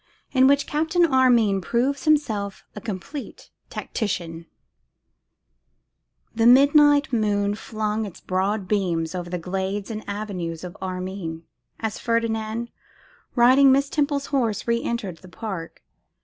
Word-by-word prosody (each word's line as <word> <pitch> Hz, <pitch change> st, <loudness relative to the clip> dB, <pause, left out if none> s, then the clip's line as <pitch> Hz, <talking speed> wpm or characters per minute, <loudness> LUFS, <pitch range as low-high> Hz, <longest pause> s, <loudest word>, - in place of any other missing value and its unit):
In 260 Hz, -1 st, +5 dB
Which 280 Hz, +1 st, +3 dB
Captain 320 Hz, +3 st, +2 dB
Armine 245 Hz, -8 st, +3 dB
Proves 260 Hz, +8 st, -1 dB
Himself 220 Hz, -11 st, +1 dB
a 210 Hz, -, -7 dB
Complete 230 Hz, +7 st, -7 dB, 0.2 s
Tactician. 170 Hz, -6 st, -4 dB, 1.9 s
THE 225 Hz, 0 st, +3 dB
midnight 285 Hz, +2 st, +6 dB
moon 205 Hz, -2 st, +1 dB
flung 215 Hz, 0 st, -3 dB
its 190 Hz, -, -11 dB
broad 190 Hz, +2 st, -1 dB
beams 175 Hz, -5 st, 0 dB
over 175 Hz, -1 st, -5 dB
the 180 Hz, -, -2 dB
glades 190 Hz, +4 st, -3 dB
and 215 Hz, -1 st, -5 dB
avenues 185 Hz, -6 st, -4 dB
of 180 Hz, -1 st, -7 dB
Armine, 185 Hz, -3 st, -5 dB, 0.4 s
as 220 Hz, -2 st, -3 dB
Ferdinand, 230 Hz, 0 st, -1 dB, 0.6 s
riding 260 Hz, +3 st, +6 dB
Miss 275 Hz, +1 st, +3 dB
Temple's 285 Hz, -2 st, 0 dB
horse, 235 Hz, -7 st, 0 dB
re 235 Hz, 0 st, +1 dB
entered 205 Hz, -9 st, -3 dB
the 185 Hz, +2 st, -15 dB
park. 185 Hz, -4 st, -7 dB
215 Hz, 120 wpm, -24 LUFS, 190-260 Hz, 1.9 s, midnight